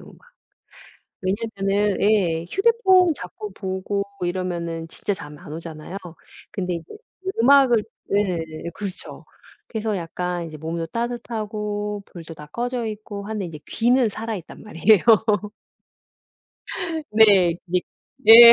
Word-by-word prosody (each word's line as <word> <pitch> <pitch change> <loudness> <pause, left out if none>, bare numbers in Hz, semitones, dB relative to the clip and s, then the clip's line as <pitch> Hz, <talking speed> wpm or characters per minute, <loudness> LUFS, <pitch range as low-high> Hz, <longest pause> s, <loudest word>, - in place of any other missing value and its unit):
음악. - - -14 1.1
왜냐면은 200 0 0
예 185 -6 +2
휴대폰 385 -5 +4
자꾸 210 -2 -8
보고 190 +1 -2 0.2
이러면은 170 -2 -2
진짜 205 - -3
잠 150 -5 -9
안 165 -4 -10
오잖아요. 165 +3 -7 0.5
근데 180 -3 -2
인제 165 -1 -8 0.5
음악을 255 -4 +6 0.3
예예, 170 -5 -1
그렇죠. 200 -3 -7 0.4
그래서 220 -3 -2
약간 175 +1 -3
이제 155 -1 -8
몸도 165 +2 -3
따뜻하고 210 -3 -3
불도 165 -2 -10
다 150 -1 -11
꺼져 245 +2 -2
있고 210 -2 -6
하는데 215 -3 -3
인제 155 -2 -8
귀는 245 +1 +3
살아있단 215 -4 -6
말이에요. 210 +1 +4 2.1
네 200 -6 +6
그게 180 0 +1 0.4
네. 235 +2 +12
200 Hz, 250 characters per minute, -23 LUFS, 170-220 Hz, 2.1 s, 네